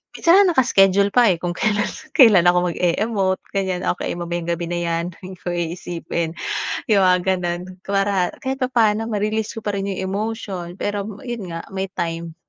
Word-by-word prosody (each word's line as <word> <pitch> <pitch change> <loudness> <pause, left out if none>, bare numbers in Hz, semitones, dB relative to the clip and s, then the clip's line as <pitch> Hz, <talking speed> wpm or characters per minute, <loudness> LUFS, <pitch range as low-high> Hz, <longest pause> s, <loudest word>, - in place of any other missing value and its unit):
Minsan 375 +4 +5
naka-schedule 200 - +4
pa, 245 -3 +5
eh, 180 - +2
kung 175 -1 -2
kailan 210 +3 +1 0.3
kailan 200 -9 +7
ako 180 0 +3
mag-e-emote, 190 +1 0
ganyan, 190 -2 -1
okey 175 - -4
mamayang 175 0 -4
gabi 170 0 -1
na 175 - -1
'yan. 170 0 -1 0.2
Hindi 185 0 -9
ko 175 - -3
iisipin. 170 -1 -3 0.6
Yung 200 -2 +5
mga 180 0 +4 0.2
gano'n. 175 -1 -3 0.2
Para 195 -2 +1 0.2
kahit 265 +1 -2
papa'no 225 -3 +2
ma-release 215 +1 -1
ko - - -4
pa 205 - -1
rin 195 0 -2
yung 190 - -3
emotion, 200 -4 -4
pero 205 0 -2 0.2
yun 235 -7 -5
nga, 165 0 -6
may 190 0 -2
time. 165 -1 -4
190 Hz, 170 wpm, -21 LUFS, 175-210 Hz, 0.6 s, kailan